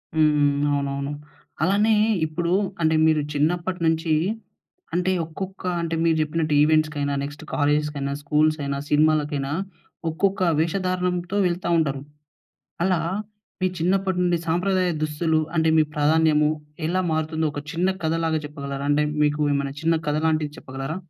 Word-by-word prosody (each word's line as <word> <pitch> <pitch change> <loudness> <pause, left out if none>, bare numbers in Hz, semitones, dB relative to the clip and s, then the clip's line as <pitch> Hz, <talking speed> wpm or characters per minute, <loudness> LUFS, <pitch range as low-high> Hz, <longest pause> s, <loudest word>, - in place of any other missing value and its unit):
హ్మ్, 155 -1 +4
హ్మ్. 145 -1 +3 0.2
అవునవును. 140 0 -2 0.5
అలానే 205 +5 +3 0.3
ఇప్పుడు 170 +2 -2 0.3
అంటే 160 0 +3
మీరు 155 -1 +3
చిన్నప్పటి 175 +5 0
నుంచి 160 0 +1 0.8
అంటే 180 +1 +1
ఒక్కొక్క 190 +4 -7 0.2
అంటే 165 0 -2
మీరు 165 -1 +3
జెప్పినట్టు 155 0 -1
ఈవెంట్స్‌కైనా, 150 -2 +2
నెక్స్ట్ 145 0 -7
కాలేజెస్‌కైనా, 150 -1 0
స్కూల్సయినా, 150 -1 +1
సినిమాలకైనా 150 -2 +2 0.6
ఒక్కొక్క 195 +4 0 0.2
వేషధారణంతో 180 +2 -1
వెళ్తా 175 0 -2
ఉంటారు. 140 -4 0 0.8
అలా 185 -3 +2 0.6
మీ 185 - +3
చిన్నప్పటి 190 +2 +1
నుండి 175 -1 +2
సాంప్రదాయ 180 +2 +1
దుస్తులు 155 +1 +1 0.2
అంటే 160 0 +3
మీ - - +6
ప్రాధాన్యము 150 0 +3 0.4
ఎలా 185 +2 +1
మారుతుందో 160 0 0
ఒక 145 - -5
చిన్న 175 +2 +1 0.2
కథలాగా 160 -1 0
చెప్పగలరా? 140 -1 -6
అంటే 150 +1 +3 0.2
మీకు 150 0 +1
ఏమన్నా 140 0 -2
చిన్న 165 +1 +3
కథ 150 - +1
లాంటిది 155 -2 0
చెప్పగలరా? 135 +5 -5
155 Hz, 130 wpm, -23 LUFS, 150-175 Hz, 0.8 s, మీ